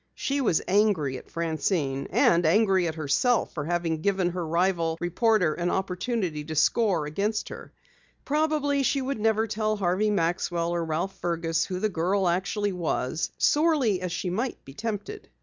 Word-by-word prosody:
She 280 Hz, +1 st, -1 dB
was 195 Hz, -10 st, +1 dB
angry 185 Hz, -10 st, +2 dB
at -, -, -19 dB
Francine 155 Hz, -4 st, -1 dB
and 170 Hz, +1 st, +3 dB
angry 190 Hz, +1 st, +3 dB
at 160 Hz, -, -3 dB
herself 160 Hz, -, +1 dB
for 150 Hz, -3 st, -4 dB
having 165 Hz, -1 st, -1 dB
given 190 Hz, -1 st, +1 dB
the 180 Hz, +1 st, -4 dB
rival 170 Hz, 0 st, 0 dB
reporter 180 Hz, -1 st, +2 dB
an 175 Hz, +2 st, -2 dB
opportunity 185 Hz, -4 st, -2 dB
to 155 Hz, +1 st, -5 dB
score 180 Hz, 0 st, +2 dB
against 200 Hz, +8 st, -2 dB
her. -, -, -9 dB, 0.5 s
Probably 295 Hz, -1 st, +1 dB
she 275 Hz, +1 st, +1 dB
would 270 Hz, -2 st, -3 dB
never 220 Hz, 0 st, +2 dB
tell 215 Hz, 0 st, -1 dB
Harvey 195 Hz, +2 st, +1 dB
Maxwell 170 Hz, -2 st, 0 dB
or 170 Hz, -1 st, -1 dB
Ralph 170 Hz, +4 st, -2 dB
Fergus 165 Hz, -1 st, -1 dB
who 185 Hz, -1 st, -3 dB
the 215 Hz, -, 0 dB
girl 185 Hz, +2 st, 0 dB
actually 195 Hz, +4 st, 0 dB
was, 160 Hz, -4 st, -2 dB
sorely 290 Hz, -, +2 dB
as 180 Hz, -1 st, -3 dB
she 180 Hz, +1 st, -3 dB
might 235 Hz, +8 st, -3 dB
be 135 Hz, -, -11 dB
tempted. 225 Hz, -, -5 dB
180 Hz, 165 wpm, -26 LUFS, 165-215 Hz, 0.5 s, and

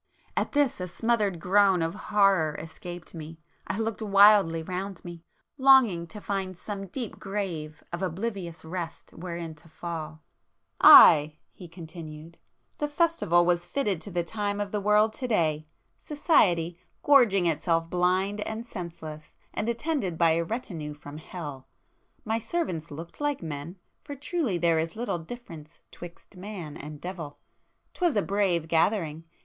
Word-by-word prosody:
At -, -, -1 dB
this, 285 Hz, -9 st, +1 dB
a 180 Hz, -, -3 dB
smothered 205 Hz, -1 st, 0 dB
groan 190 Hz, 0 st, +3 dB
of 165 Hz, +1 st, -2 dB
horror 195 Hz, -7 st, +2 dB
escaped 175 Hz, +2 st, -9 dB
me,—I 165 Hz, +3 st, -8 dB
looked 225 Hz, 0 st, -2 dB
wildly 200 Hz, -5 st, +5 dB
round 185 Hz, +2 st, -5 dB
me, 170 Hz, -1 st, -9 dB, 0.4 s
longing 255 Hz, -11 st, +5 dB
to 210 Hz, -, -9 dB
find 195 Hz, -3 st, -3 dB
some 195 Hz, 0 st, -6 dB
deep 235 Hz, +3 st, -6 dB
grave 175 Hz, -7 st, -4 dB
of 170 Hz, -, -3 dB
oblivious 185 Hz, -2 st, -4 dB
rest 165 Hz, 0 st, -6 dB
wherein 170 Hz, -1 st, -6 dB
to 160 Hz, +2 st, -16 dB
fall. 155 Hz, -2 st, -6 dB, 0.6 s
"Aye!" 150 Hz, +1 st, +9 dB, 0.2 s
he 180 Hz, -, -11 dB
continued—"The 165 Hz, -, -9 dB
festival 290 Hz, -, +2 dB
was 175 Hz, 0 st, +1 dB
fitted 205 Hz, -, -1 dB
to 205 Hz, -, -7 dB
the 175 Hz, -2 st, -1 dB
time 205 Hz, +2 st, -3 dB
of 205 Hz, -1 st, -3 dB
the 210 Hz, -, -1 dB
world 210 Hz, +2 st, +3 dB
to 255 Hz, -, -4 dB
day!—Society, 170 Hz, -, 0 dB, 0.2 s
gorging 235 Hz, -10 st, +5 dB
itself 165 Hz, +1 st, +1 dB
blind 185 Hz, +4 st, 0 dB
and 220 Hz, +2 st, -4 dB
senseless, 165 Hz, -7 st, -8 dB, 0.2 s
and 215 Hz, -, -2 dB
attended 235 Hz, -, -2 dB
by 165 Hz, -1 st, +4 dB
a 165 Hz, +1 st, +1 dB
retinue 165 Hz, -7 st, -5 dB
from 145 Hz, +1 st, -10 dB
Hell! 150 Hz, -6 st, -8 dB, 0.6 s
My 225 Hz, +1 st, 0 dB
servants 215 Hz, -, -3 dB
looked 165 Hz, -, -9 dB
like 290 Hz, -8 st, -1 dB
men!—for 165 Hz, -, -8 dB
truly 285 Hz, -, -1 dB
there 170 Hz, -1 st, +2 dB
is 165 Hz, +1 st, -3 dB
little 215 Hz, -6 st, -2 dB
difference 165 Hz, -5 st, -10 dB
'twixt 175 Hz, +2 st, -12 dB
man 180 Hz, -6 st, -7 dB
and 150 Hz, 0 st, -9 dB
devil! 170 Hz, -5 st, -7 dB, 0.6 s
'Twas 350 Hz, -7 st, +1 dB
a 205 Hz, -, +2 dB
brave 190 Hz, -5 st, 0 dB
gathering! 165 Hz, -1 st, +1 dB
180 Hz, 140 wpm, -27 LUFS, 165-210 Hz, 0.6 s, Aye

